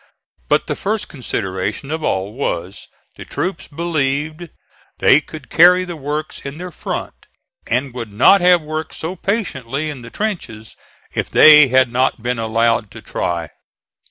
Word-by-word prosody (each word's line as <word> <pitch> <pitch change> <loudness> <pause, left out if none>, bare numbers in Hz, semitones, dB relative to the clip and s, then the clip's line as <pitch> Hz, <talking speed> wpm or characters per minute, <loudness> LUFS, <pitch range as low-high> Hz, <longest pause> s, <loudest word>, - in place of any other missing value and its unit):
But - - +3
the - - -2
first 215 +1 -3
consideration 105 - -4
of 160 0 -3
all 95 -2 -1
was 95 -8 -4 0.3
the - - -8
troops 180 -1 -4
believed 155 +1 -2 0.5
they 145 - +5
could 155 -3 -12
carry 180 +2 +6
the 175 -1 -6
works 150 +1 -4
in 140 +2 -7
their 180 +1 -7
front, - - -6 0.4
and 125 +2 0
would 115 -4 -6
not 150 - +5
have 180 -2 +5
worked 155 +1 -5
so 165 +4 -5
patiently 155 - -2
in 135 -4 -9
the 115 - -10
trenches 140 - -5 0.4
if - - -2
they 150 -2 +8
had 130 -1 +3
not 125 -2 0
been 120 -1 -1
allowed 115 -1 +1
to - - -10
try. 85 -2 -3
140 Hz, 155 wpm, -18 LUFS, 115-165 Hz, 0.5 s, they